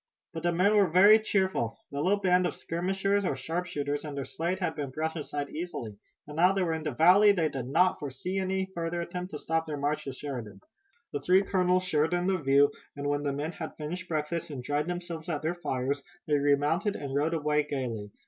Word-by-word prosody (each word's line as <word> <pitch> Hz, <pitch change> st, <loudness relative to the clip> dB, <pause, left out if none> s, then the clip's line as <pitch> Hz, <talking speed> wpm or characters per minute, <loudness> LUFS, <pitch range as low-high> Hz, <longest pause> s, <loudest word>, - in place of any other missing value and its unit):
But 165 Hz, -, -5 dB
the 175 Hz, -, +1 dB
men 190 Hz, +5 st, +3 dB
were 200 Hz, -2 st, +5 dB
very 200 Hz, +6 st, +7 dB
cheerful. 190 Hz, -, 0 dB
The 140 Hz, 0 st, -2 dB
little 195 Hz, +5 st, +2 dB
band 180 Hz, -2 st, +3 dB
of 155 Hz, -, -5 dB
skirmishers 195 Hz, +4 st, -1 dB
or -, -, 0 dB
sharpshooters 150 Hz, -4 st, -3 dB
under 140 Hz, -3 st, -4 dB
Slade 170 Hz, +7 st, -2 dB
had 185 Hz, -, -1 dB
been 145 Hz, -3 st, -4 dB
brushed 160 Hz, +4 st, -3 dB
aside 145 Hz, -2 st, -4 dB
easily, 150 Hz, -, -5 dB, 0.3 s
and 150 Hz, +1 st, -9 dB
now 175 Hz, +2 st, +6 dB
that 195 Hz, -, +1 dB
they 195 Hz, -, +2 dB
were 165 Hz, -2 st, 0 dB
in 160 Hz, -, -3 dB
the 155 Hz, -, -2 dB
valley 180 Hz, +9 st, +6 dB
they 165 Hz, -5 st, +1 dB
did 130 Hz, -4 st, -5 dB
not 180 Hz, +7 st, +3 dB
foresee 150 Hz, +7 st, -3 dB
any 190 Hz, 0 st, 0 dB
further 170 Hz, 0 st, -2 dB
attempt 180 Hz, +1 st, -5 dB
to 150 Hz, -, -5 dB
stop 160 Hz, +1 st, -1 dB
their 150 Hz, -2 st, -3 dB
march 145 Hz, +2 st, -1 dB
to 135 Hz, -, -3 dB
Sheridan. 130 Hz, -5 st, -7 dB, 0.5 s
The -, -, -2 dB
three 185 Hz, +2 st, +4 dB
colonels 185 Hz, -1 st, +2 dB
shared 160 Hz, -1 st, +1 dB
in 175 Hz, 0 st, 0 dB
the 190 Hz, 0 st, +2 dB
view, 140 Hz, 0 st, +4 dB, 0.2 s
and 145 Hz, 0 st, -3 dB
when 145 Hz, 0 st, 0 dB
the 145 Hz, -1 st, -1 dB
men 145 Hz, +4 st, -3 dB
had 160 Hz, -2 st, -7 dB
finished 175 Hz, +4 st, -5 dB
breakfast 160 Hz, +2 st, -2 dB
and 135 Hz, -4 st, -6 dB
dried 145 Hz, +4 st, -1 dB
themselves 175 Hz, -2 st, -5 dB
at 150 Hz, -3 st, -2 dB
their 160 Hz, +2 st, 0 dB
fires 140 Hz, -4 st, -2 dB, 0.2 s
they 150 Hz, -, -1 dB
remounted 145 Hz, +8 st, +2 dB
and 140 Hz, -2 st, -5 dB
rode 150 Hz, +4 st, +1 dB
away 150 Hz, -1 st, +2 dB
gaily. 125 Hz, -8 st, -4 dB
160 Hz, 220 wpm, -29 LUFS, 145-180 Hz, 0.5 s, very